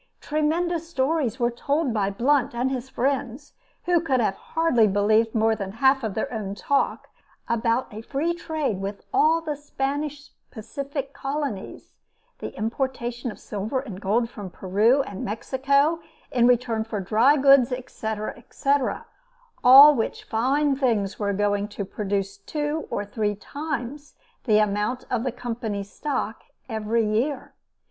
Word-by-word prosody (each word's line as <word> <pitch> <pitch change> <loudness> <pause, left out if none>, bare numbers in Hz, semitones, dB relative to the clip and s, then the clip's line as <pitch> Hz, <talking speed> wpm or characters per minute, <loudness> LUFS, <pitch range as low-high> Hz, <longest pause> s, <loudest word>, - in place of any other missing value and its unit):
Tremendous 330 +2 -1
stories 275 -4 0
were 240 0 +2
told 280 +2 -1
by 200 -3 +1
Blunt 245 +5 +1
and 250 +3 0
his 260 0 -4
friends, 270 +1 -2 0.3
who 345 -2 +2
can 270 -6 +1
hardly 240 +4 +2
have 200 - 0
believed 215 +3 +3
more 220 0 +3
than 195 -3 -5
one 200 - -11
half 270 +1 +4
of 215 -3 -3
their 250 +4 -2
own 200 -3 -4
talk, 280 +8 0 0.4
about 235 +2 +1
a 215 - -6
free 290 +8 -1
trade 310 - -2
with 200 +1 -5
all 330 -4 +4
the 305 -2 -3
Spanish 290 +1 -4 0.2
Pacific 275 +4 -6
colonies, 275 -7 -5 0.5
the - - -5
importation 240 +1 -2
of - - -8
silver 215 +6 -3
and 210 -8 -8
gold 225 +4 +1
from 205 -5 -8
Peru 210 +10 +2
and 200 -7 -7
Mexico 280 +8 +1 0.3
in 240 -1 +4
return 240 -2 +2
for 220 -2 -4
dry 225 +9 +4
goods, 275 -2 +6
etc., 220 -4 -4
etc.; 275 +3 -1 0.6
all 275 +4 +10
which 230 -5 -2
fine 275 +5 +1
things 225 -8 0
were 205 -1 0
going 205 0 0
to 205 -1 -5
produce 195 0 -3
two 295 +8 -3
or 205 - -2
three 205 0 -1
times 285 +3 -6 0.3
the 215 -4 +4
amount 210 +4 0
of 240 -2 0
the 255 - -1
Company's 225 -5 -4
stock 270 -6 -3 0.2
every 220 0 0
year. 245 +6 -1
245 Hz, 150 wpm, -24 LUFS, 215-280 Hz, 0.6 s, all